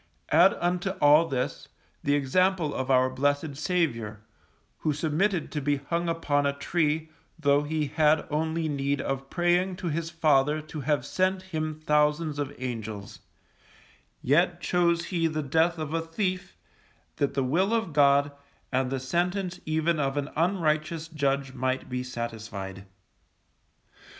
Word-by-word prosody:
Add 175 +5 +6
unto 175 +2 -1
all 150 +3 +6
this, 130 -5 -3 0.4
the 145 0 +2
example 165 +3 +1
of 130 0 -3
our 130 -1 +4
blessed 145 +3 0
Saviour, 130 - -1 0.6
who 155 - 0
submitted 160 +4 0
to 150 - -2
be 145 +1 +1
hung 170 +5 -2
upon 145 -4 +1
a 140 - 0
tree, 155 +1 0 0.3
tho' 145 -2 +3
He 155 +1 -1
had 155 +1 +2
only 160 +1 -1
need 140 -1 -1
of 135 0 -3
praying 175 +1 +1
to 175 -1 -4
His 165 +1 -2
Father 150 -3 +2
to 155 0 -8
have 145 +1 0
sent 185 0 0
Him 155 -1 -2
thousands 150 0 +1
of 145 -1 -2
Angels; 110 -5 -6 1.0
yet 170 +6 +3
chose 170 -1 +1
He 170 -3 0
the 155 -1 -2
death 165 +5 +2
of 155 -1 -4
a 165 - +1
thief, 185 +3 -3 0.6
that 140 - 0
the 135 - +1
Will 175 - +1
of 225 -8 0
God, 145 0 +4 0.4
and 130 0 +1
the 135 0 -2
sentence 180 +6 -1
even 160 +1 +1
of 135 0 -1
an 145 0 -2
unrighteous 160 -2 0
judge 140 -3 -1
might 130 0 -2
be 125 0 -2
satisfied. 110 -6 -6
150 Hz, 145 wpm, -27 LUFS, 140-170 Hz, 1.0 s, Add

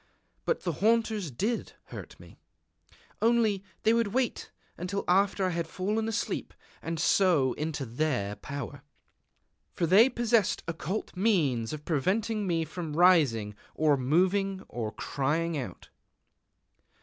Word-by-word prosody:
But 485 - 0
the 175 - 0
haunters 220 -4 +2
did 210 - -2 0.2
hurt - - -9
me. - - -15 0.8
Only 225 -4 +2 0.2
they 220 - +4
would 230 -1 +2
wait 245 +3 -1 0.3
until 190 +3 -3
after 195 +1 +3
I - - +1
had 170 -2 -2
fallen 210 +6 -2
asleep, 225 - -3 0.3
and 165 -1 -4
so 155 -7 +3
into 150 -2 -3
their 120 -5 -1
power, 140 0 -6 0.9
for 170 - +1
they 200 +9 +6
possessed 230 -5 +1
occult 165 +6 -4
means 155 - +1
of 150 -1 -7
preventing 205 +7 0
me 165 -2 0
from 160 -1 -6
rising 145 - +4 0.2
or 155 -2 +3
moving 185 +8 +1
or 110 -3 -4
crying 155 +9 -1
out. 120 -11 -6
175 Hz, 125 wpm, -29 LUFS, 150-205 Hz, 0.9 s, they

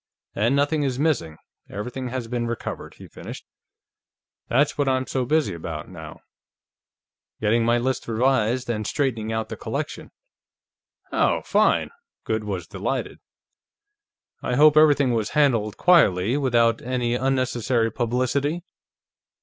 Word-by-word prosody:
And 115 +6 +1
nothing 145 +2 +1
is 135 -3 -1
missing; 130 - 0 0.3
everything 125 +6 -5
has 125 -1 -4
been 120 0 -2
recovered," 115 -1 -5
he - - -12
finished. - - -10 1.0
"That's 140 +4 +2
what 145 -2 +1
I'm 130 0 +1
so 130 -1 -2
busy 150 - +1
about, 80 -2 -6
now; 80 -4 -10 1.2
getting 110 +2 +2
my 120 +1 +3
list 130 +2 -2
revised, 120 +1 +1
and 110 -3 -2
straightening 115 -6 -1
out 110 0 -2
the - - -6
collection." - - -5 1.0
"Oh, - - +1
fine!" - - +2 0.3
Goode 110 -1 -2
was 95 -5 -4
delighted. - - -4 1.2
"I 125 - -1
hope 150 +2 +6
everything 145 -4 +5
was 110 -2 -1
handled 115 -8 +2
quietly, 115 - +4
without 120 -5 +2
any 125 -1 -1
unnecessary 125 -3 0
publicity? 130 +8 -1
120 Hz, 125 wpm, -24 LUFS, 110-135 Hz, 1.2 s, hope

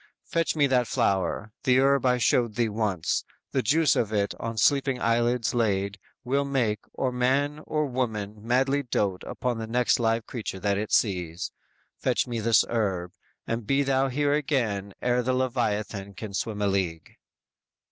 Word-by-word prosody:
Fetch 165 -2 0
me 145 -2 +4
that 125 -3 +2
flower; 95 +2 0
the 125 0 +4
herb 135 -1 +3
I 125 0 +3
showed 120 -2 +2
thee 115 -1 +1
once, 105 -6 -1 0.3
The 130 - +1
juice 155 +2 +3
of 110 -2 0
it 100 -2 0
on 115 -1 -4
sleeping 135 +1 +2
eyelids 120 0 +1
laid, 100 -4 0 0.2
Will 140 +3 +1
make, 125 -7 0
or 130 - -1
man 135 +4 +1
or 150 -1 0
woman 110 -6 -3
madly 135 +5 +2
dote 100 -7 -1
Upon 125 -2 -2
the 110 - -4
next 125 +2 +2
live 115 -1 +1
creature 110 -5 -5
that 100 +1 0
it 110 - -4
sees. 90 -4 0 0.5
Fetch - - +1
me 120 -2 -3
this 115 +1 +4
herb; 95 -6 -1 0.3
and 115 -2 -3
be 140 +1 +3
thou 135 0 +2
here 145 +2 +1
again 115 -10 -1
Ere 125 0 +2
the 130 +1 0
Leviathan 105 -5 -1
can 105 +1 -7
swim 105 +1 -2
a - - +2
league." 90 -5 -2
115 Hz, 165 wpm, -26 LUFS, 105-130 Hz, 0.5 s, me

